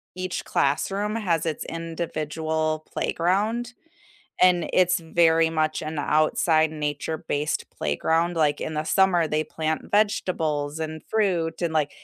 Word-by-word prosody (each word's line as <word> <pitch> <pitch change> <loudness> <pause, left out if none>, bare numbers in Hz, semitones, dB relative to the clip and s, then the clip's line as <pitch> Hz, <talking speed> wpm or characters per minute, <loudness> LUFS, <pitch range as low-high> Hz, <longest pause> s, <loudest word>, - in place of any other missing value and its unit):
each 185 0 -3
classroom 195 +9 0
has 175 -8 0
its 160 -2 -2
individual 160 -1 -3
playground, 215 +8 0 0.7
and 180 -2 +4
it's 180 -1 +3
very 165 0 +3
much 155 -1 0
an 155 0 -4
outside 155 +2 +2
nature-based 150 0 -2
playground, 165 - 0
like, 150 -2 +2
in 155 - -4
the 155 0 -2
summer, 180 -1 +3
they 155 0 +1
plant 160 0 -3
vegetables 160 -8 0
and 155 -1 -5
fruit 185 -7 0
and 170 -2 -1
like 150 -2 +1
160 Hz, 125 wpm, -25 LUFS, 155-180 Hz, 0.7 s, and